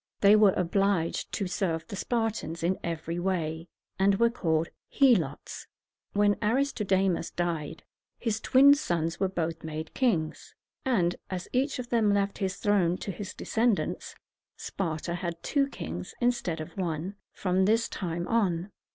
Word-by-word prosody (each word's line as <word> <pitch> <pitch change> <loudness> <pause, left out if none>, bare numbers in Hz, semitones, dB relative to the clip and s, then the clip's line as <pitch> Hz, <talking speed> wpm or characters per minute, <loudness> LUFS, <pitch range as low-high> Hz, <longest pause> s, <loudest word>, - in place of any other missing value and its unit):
They 200 +1 +7
were 210 -3 +6
obliged 185 -1 0
to 200 - -1
serve 170 -3 -1
the 205 - -7
Spartans 225 -7 -2
in 185 +3 +1
every 165 0 -3
way, 165 -3 -2 0.3
and 195 +1 +4
were 235 +3 +3
called 165 -7 0 0.2
He´lots. 210 - +2 0.5
When 205 0 +3
Aristodemus 210 -7 +1
died, 165 -4 -3 0.3
his 220 -2 -1
twin 275 +2 +7
sons 170 - -1
were 195 - +2
both 165 -3 -3
made 160 0 -5
kings; 175 -12 -1 0.3
and, 180 -10 +2
as 185 -1 -4
each 270 +3 +1
of 245 -1 -6
them 225 -3 +3
left 200 0 0
his 190 -2 -1
throne 195 -4 +2
to 195 - -4
his 205 +1 -7
descendants, 225 -2 0 0.4
Sparta 170 -2 -3
had 170 -1 -4
two 280 -2 +2
kings, 90 - -6
instead 240 -9 0
of 155 - -7
one, 175 -1 -2 0.2
from 185 0 +1
this 225 +3 +3
time 175 -1 -4
on. 195 -4 0
190 Hz, 145 wpm, -28 LUFS, 170-215 Hz, 0.5 s, They